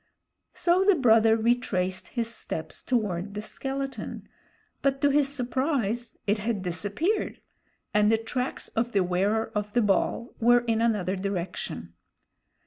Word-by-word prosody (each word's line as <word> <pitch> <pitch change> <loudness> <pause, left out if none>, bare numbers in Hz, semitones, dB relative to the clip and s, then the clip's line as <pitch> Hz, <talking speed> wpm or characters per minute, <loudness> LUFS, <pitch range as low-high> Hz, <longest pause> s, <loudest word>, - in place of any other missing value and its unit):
So 355 +2 +3
the 400 -1 +5
brother 225 -5 +5
retraced 220 -6 0
his 235 -3 -2
steps 160 -7 -6
toward 205 -5 -1
the 210 - -3
skeleton, 270 +3 -5 0.5
but 275 -1 +1
to 285 - +4
his 280 -1 +3
surprise 250 -3 -1
it 210 +1 +1
had 210 -2 -2
disappeared, 205 - -1 0.5
and 210 +1 +4
the 225 - +4
tracks 250 +3 -3
of 235 +1 -1
the 195 -2 +3
Wearer 200 +5 0
of 210 0 -3
the 240 - +3
Ball 210 +4 0
were 240 +1 +5
in 230 -2 0
another 205 -5 +1
direction. 185 - -4
225 Hz, 135 wpm, -27 LUFS, 200-250 Hz, 0.5 s, the